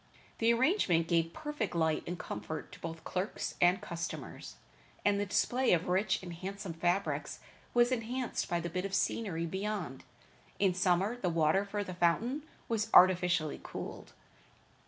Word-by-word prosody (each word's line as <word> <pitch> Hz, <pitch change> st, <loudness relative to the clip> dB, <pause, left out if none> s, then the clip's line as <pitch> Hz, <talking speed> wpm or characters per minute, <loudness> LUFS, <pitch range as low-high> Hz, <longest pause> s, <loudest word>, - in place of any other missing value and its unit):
The 230 Hz, 0 st, +4 dB
arrangement 235 Hz, -, +3 dB
gave 165 Hz, -1 st, +2 dB
perfect 295 Hz, -, -4 dB
light 160 Hz, -2 st, +2 dB
and 175 Hz, +1 st, -3 dB
comfort 110 Hz, +7 st, -6 dB
to -, -, -12 dB
both 165 Hz, -1 st, -6 dB
clerks 185 Hz, +2 st, -3 dB
and 180 Hz, +2 st, +5 dB
customers, 170 Hz, -1 st, -6 dB, 0.5 s
and 205 Hz, 0 st, +3 dB
the 205 Hz, -, -1 dB
display 250 Hz, +6 st, +2 dB
of 170 Hz, 0 st, +1 dB
rich 190 Hz, +1 st, +1 dB
and 175 Hz, -2 st, -6 dB
handsome 190 Hz, +1 st, -6 dB
fabrics 175 Hz, +4 st, -1 dB, 0.4 s
was 240 Hz, +1 st, +5 dB
enhanced 250 Hz, +1 st, -2 dB
by 175 Hz, -1 st, 0 dB
the 170 Hz, -, -3 dB
bit 180 Hz, +1 st, -2 dB
of 195 Hz, 0 st, -2 dB
scenery 175 Hz, -7 st, 0 dB
beyond. 190 Hz, -6 st, -3 dB, 0.5 s
In 195 Hz, -2 st, +3 dB
summer 185 Hz, +5 st, +2 dB
the 190 Hz, -7 st, -1 dB
water 165 Hz, +3 st, +3 dB
for 205 Hz, +1 st, -2 dB
the 185 Hz, -, -6 dB
fountain 195 Hz, -, +1 dB, 0.3 s
was 225 Hz, -1 st, -1 dB
artificially 180 Hz, -4 st, +5 dB
cooled. -, -, -7 dB
185 Hz, 155 wpm, -32 LUFS, 170-210 Hz, 0.5 s, and